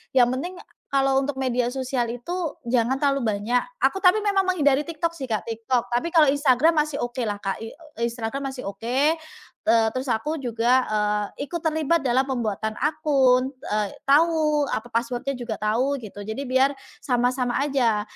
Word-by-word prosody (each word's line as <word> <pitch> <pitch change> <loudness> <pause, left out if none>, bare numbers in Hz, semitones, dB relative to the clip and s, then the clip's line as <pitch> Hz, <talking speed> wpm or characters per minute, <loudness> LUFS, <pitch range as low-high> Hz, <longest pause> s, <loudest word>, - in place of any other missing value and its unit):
yang 245 -2 +6
penting 355 +8 -4 0.3
kalau 270 0 +2
untuk 275 -1 -3
media 250 -2 0
sosial 255 -2 -2
itu 245 +9 -6 0.3
jangan 245 +2 +2
terlalu 275 -2 +2 0.2
banyak. 240 +4 +1 0.2
Aku 385 - +2
tapi 370 +3 +6
memang 400 -1 +3
menghindari 290 -6 +3
TikTok 335 0 -2
sih 265 -5 -6
Kak. 215 -2 -1
TikTok, 230 +2 -1
tapi 290 +8 0
kalau 320 -3 +7
Instagram 290 +3 +3
masih 295 -2 -5
okelah 240 -4 -2
Kak, 195 -1 -2
i 225 - -6 0.3
Instagram 235 +4 -3
masih 260 -1 -8
oke. 250 +9 +1 0.6
Eee, 225 -1 +5
terus 255 0 -3
aku 295 +7 -1
juga, 240 +1 +2
eee, 210 +4 -1
ikut 340 +2 -5
terlibat 320 0 +1
dalam 260 0 +2
pembuatan 220 -5 -2
akun, 275 -4 +2
eee, 210 -5 -2 0.2
tahu 300 0 +3
apa 240 -3 -4
password-nya 245 +3 -2
juga 235 -3 -4
tahu 255 +6 +1
gitu, 205 -2 -9
jadi 220 +5 -4
biar 265 +2 +3 0.3
sama-sama 250 0 +1
aja. 250 -7 +1
260 Hz, 160 wpm, -24 LUFS, 235-285 Hz, 0.6 s, kalau